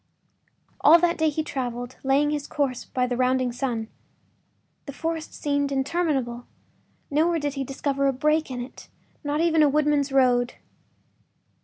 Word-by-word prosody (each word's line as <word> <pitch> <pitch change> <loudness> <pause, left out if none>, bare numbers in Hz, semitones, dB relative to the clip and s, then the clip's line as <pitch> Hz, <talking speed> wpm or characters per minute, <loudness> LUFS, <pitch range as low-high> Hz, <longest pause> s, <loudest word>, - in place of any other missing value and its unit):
All 315 +3 +8
that 340 0 +1
day 315 0 +3
he 310 +1 -2
traveled, 245 -3 -4
laying 280 +2 +2
his 295 -1 -3
course 270 -4 -2
by 250 -1 -1
the 250 0 -2
rounding 255 0 +1
sun. 240 -3 -3 1.0
The 280 - -6
forest 325 +2 -4
seemed 285 -1 -1
interminable; 270 -4 -1 0.6
nowhere 330 +4 +2
did 290 -3 -2
he 275 -1 -3
discover 275 +1 -1
a - - +3
break 305 +4 +1
in 250 -1 -4
it, 245 - -10 0.3
not 295 +1 -1
even 325 -2 +3
a 295 - +5
woodman’s 295 -1 +1
road. 250 -2 +3
280 Hz, 150 wpm, -25 LUFS, 255-300 Hz, 1.0 s, All